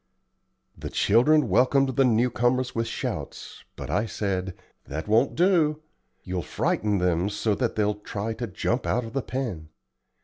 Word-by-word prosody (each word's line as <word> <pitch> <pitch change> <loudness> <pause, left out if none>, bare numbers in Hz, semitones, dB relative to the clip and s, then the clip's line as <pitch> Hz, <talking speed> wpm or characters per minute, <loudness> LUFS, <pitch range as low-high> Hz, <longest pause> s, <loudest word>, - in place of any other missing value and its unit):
The - - -7
children 145 +9 +3
welcomed 135 +2 +3
the 135 - +4
new 120 +1 +2
comers 125 +2 +1
with 115 0 -1
shouts; - - -5
but - - -6
I 105 +4 +1
said: 95 -3 -3 0.3
"That 80 +6 -5
won't 115 +5 +3
do. 160 -4 +2 0.4
You'll 90 -1 -3
frighten 105 +5 0
them 90 +1 +1
so 105 +1 0
that 120 +2 -1
they'll 105 -1 +1
try 105 +1 -5
to 120 +1 -5
jump 115 +6 -2
out 125 -1 0
of 115 - -9
the 135 - 0
pen. 110 -15 -4
115 Hz, 160 wpm, -25 LUFS, 100-130 Hz, 0.4 s, the